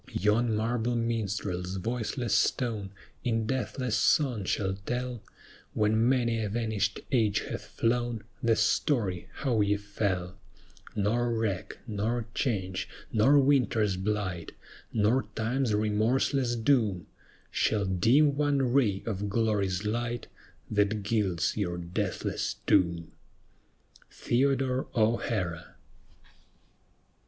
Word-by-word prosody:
Yon 110 +4 +2
marble 115 +2 0
minstrel's 100 -5 -2
voiceless 115 +2 -2
stone 105 0 +1 0.3
In 115 -3 0
deathless 125 -1 -1
song 115 -1 +2
shall 95 +1 0
tell 125 -1 -3 0.5
When 110 +2 +3
many 120 -3 +1
a 105 - -2
vanished 105 -3 -1
age 110 -6 +2
hath - - -6
flown, 120 -1 -1 0.2
The 115 -1 +3
story 110 - +1
how 120 -7 0
ye 105 0 +2
fell; 100 -3 -3 0.6
Nor 120 +4 +1
wreck, 110 -5 -2
nor 110 +1 -1
change, 95 -7 -2 0.2
nor 120 +6 +5
winter's 125 -8 +3
blight, 95 -3 -3 0.4
Nor 110 +2 +2
Time's 120 +2 0
remorseless 115 +4 +1
doom, 110 -7 +2 0.5
Shall 105 -2 +1
dim 125 - +4
one 140 -4 +1
ray 105 -8 +2
of 105 -2 -2
glory's 105 -3 0
light 120 +2 -2 0.5
That 105 0 +1
gilds 100 -5 0
your 90 -5 -2
deathless 85 0 -2
tomb. 85 -2 +2 1.0
THEODORE 130 +1 0
O'HARA. 110 -7 0
110 Hz, 105 wpm, -29 LUFS, 100-120 Hz, 1.0 s, nor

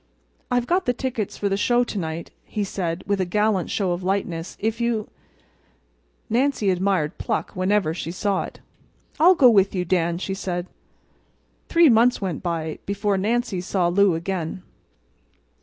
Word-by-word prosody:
"I've 245 -1 +1
got 360 +4 0
the 245 - +3
tickets 240 -5 -3
for 205 - -1
the 195 - +1
show 240 +4 +3
to 220 -4 -4
night," 160 -1 -5
he 210 - -3
said, 175 -3 -3
with 200 0 0
a - - +3
gallant 210 0 +1
show 195 -4 0
of 175 +1 -2
lightness. 180 -3 -2
"If 225 +2 -1
you—" 235 -3 -1 1.2
Nancy 240 -4 +1
admired 180 -4 0
pluck - - -2
whenever 185 -2 +1
she 165 - -5
saw 195 +2 0
it. - - -12 0.6
"I'll 355 +4 +7
go 255 -6 +7
with 195 -2 +3
you, 180 -1 -1
Dan," 170 -1 +1
she 190 +2 -3
said. 180 -2 -3 1.0
Three 335 -1 +6
months 245 0 +4
went 185 -6 -3
by 165 -3 -3
before 200 0 0
Nancy 215 -1 0
saw 180 -1 0
Lou 195 0 +3
again. 175 +1 -4
195 Hz, 160 wpm, -23 LUFS, 175-225 Hz, 1.2 s, I'll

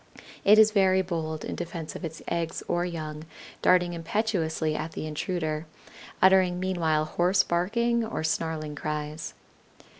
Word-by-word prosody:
It 210 +2 +7
is 215 0 +7
very 190 -2 +4
bold 160 -3 -3
in - - -4
defense 170 -2 -6
of - - -7
its 165 -1 -6
eggs 170 -1 -2
or 175 0 +1
young, 155 -3 -5 0.4
darting 180 -1 +4
impetuously 165 -3 -1
at 160 +1 -4
the - - -4
intruder, 155 0 -3 0.6
uttering 185 -1 +5
meanwhile 165 -5 +1
hoarse 180 +4 +2
barking 235 +7 +1
or 220 -7 -3
snarling 160 -1 -2
cries. 150 +1 -4
170 Hz, 140 wpm, -27 LUFS, 155-185 Hz, 0.6 s, It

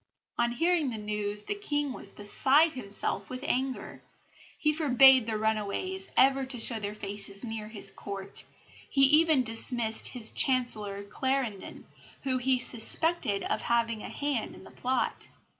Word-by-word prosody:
On 235 0 +2
hearing 330 +1 +1
the 230 - -5
news 210 -1 -3
the - - -3
King 290 -9 -2
was - - -4
beside 270 +10 +2
himself 200 -5 -4
with 255 +1 -7
anger. 265 -2 -3 0.6
He 305 0 +1
forbade 265 -5 +5
the 220 -1 -1
runaways 220 - -2
ever 270 0 +4
to 260 -2 +2
show 225 0 +4
their 205 0 -5
faces 200 0 -2
near 220 -2 -6
his 205 -3 -6
Court 195 0 -4 0.5
he 275 - +1
even 300 0 +5
dismissed 225 0 -1
his 235 -3 +2
Chancellor 215 -6 +2
Clarendon, 255 -1 -4 0.4
whom 260 -2 -1
he 260 +1 +1
suspected 245 - +2
of - - -2
having 230 -2 0
a - - -8
hand 285 -5 -3
in - - -14
the - - -15
plot. 250 -2 -2
245 Hz, 150 wpm, -28 LUFS, 210-270 Hz, 0.6 s, forbade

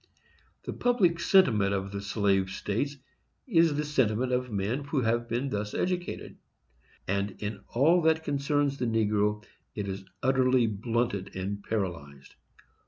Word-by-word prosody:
The - - -5
public 195 -9 +2
sentiment 110 - +4
of 95 0 -3
the 100 0 -4
slave 100 -2 +1
states 130 +10 -2 0.5
is 165 - +3
the 150 +1 -1
sentiment 130 -4 +1
of 125 -1 -1
men 105 +7 -1
who 140 -1 0
have 120 +1 0
been 125 +4 -1
thus 105 0 -3
educated, 180 -1 -3 0.7
and 100 0 -1
in 105 -1 -5
all 160 +8 +3
that 160 0 +2
concerns 145 -1 0
the 125 - 0
negro 105 -1 +1 0.3
it 105 -2 -3
is 95 0 -5 0.2
utterly 130 -1 +3
blunted 110 -1 -2
and 100 +2 -3
paralyzed. 80 -10 -4
115 Hz, 140 wpm, -28 LUFS, 100-140 Hz, 0.7 s, sentiment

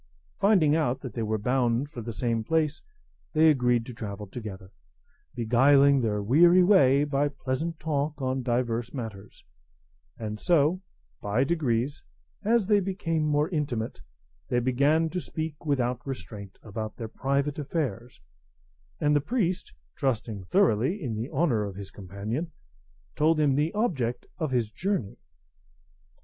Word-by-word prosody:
Finding 195 -7 +4
that 135 -4 0
they 115 - -3
were 110 0 0
bound 125 +4 0
for 125 - -6
the 115 +1 -5
same 115 0 -1
place, 155 +3 0 0.5
they 160 0 +6
agreed 125 -4 +2
to 125 - -8
travel 105 -3 -6
together, 95 -3 -8 0.6
beguiling 135 +4 +5
their 105 -3 -1
weary 170 - +6
way 145 -8 +5
by 145 0 +1
pleasant 145 +4 -3
talk 150 -1 -2
on 130 0 -1
divers 120 0 -1
matters; 105 -5 -8 0.7
and 105 -1 -5
so 170 +1 +2 0.4
by 105 +5 +1
degrees, 135 -4 -1 0.4
as 225 0 +3
they 205 +1 +4
became 180 -4 -1
more 150 0 +2
intimate, 140 -10 -3 0.5
they 125 - 0
began 140 +6 +2
to 180 - -2
speak 160 -1 -5
without 125 -3 0
restraint 105 -7 -7
about 110 0 -5
their 115 - -5
private 140 +5 -1
affairs; 130 - -3 0.8
and 150 0 +2
the 145 - +3
priest, 185 - -1 0.2
trusting 115 -6 -2
thoroughly 165 - +2
in 130 - -3
the 110 +5 -4
honour 130 -8 +1
of 100 -2 -5
his 100 0 -8
companion, 105 - -5 0.6
told 155 +1 +3
him 145 -3 +3
the 150 +4 +1
object 135 - -1
of 155 -3 -1
his 120 -4 0
journey. 185 - -2
135 Hz, 140 wpm, -27 LUFS, 115-155 Hz, 0.8 s, they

